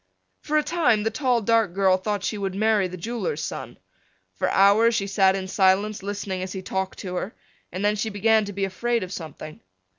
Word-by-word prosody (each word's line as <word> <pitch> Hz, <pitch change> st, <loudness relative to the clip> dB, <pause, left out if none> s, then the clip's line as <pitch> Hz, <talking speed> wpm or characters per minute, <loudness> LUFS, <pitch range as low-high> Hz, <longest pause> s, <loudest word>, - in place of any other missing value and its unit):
For 305 Hz, -, -1 dB
a 305 Hz, -, +3 dB
time 295 Hz, -12 st, +2 dB
the 225 Hz, -, 0 dB
tall 245 Hz, -2 st, +1 dB
dark 225 Hz, -4 st, +2 dB
girl 190 Hz, -1 st, +4 dB
thought 200 Hz, +1 st, -3 dB
she -, -, -2 dB
would 195 Hz, -1 st, -3 dB
marry 215 Hz, -2 st, +2 dB
the 185 Hz, 0 st, -8 dB
jeweler's 235 Hz, -, -3 dB
son. -, -, -6 dB, 0.6 s
For -, -, -1 dB
hours 215 Hz, +4 st, +4 dB
she 195 Hz, -, 0 dB
sat 195 Hz, -1 st, +3 dB
in 190 Hz, -1 st, -4 dB
silence 195 Hz, +2 st, +2 dB
listening 200 Hz, -1 st, -4 dB
as 185 Hz, 0 st, -5 dB
he 190 Hz, -1 st, -6 dB
talked 190 Hz, 0 st, -3 dB
to 180 Hz, -2 st, -6 dB
her 200 Hz, -, -4 dB, 0.4 s
and 185 Hz, +4 st, -3 dB
then 210 Hz, 0 st, +2 dB
she 215 Hz, +2 st, -2 dB
began 220 Hz, +1 st, +2 dB
to 205 Hz, -, -6 dB
be 195 Hz, 0 st, -1 dB
afraid 230 Hz, +4 st, -1 dB
of 185 Hz, +1 st, -7 dB
something. 155 Hz, -3 st, -8 dB
200 Hz, 210 wpm, -24 LUFS, 190-225 Hz, 0.6 s, girl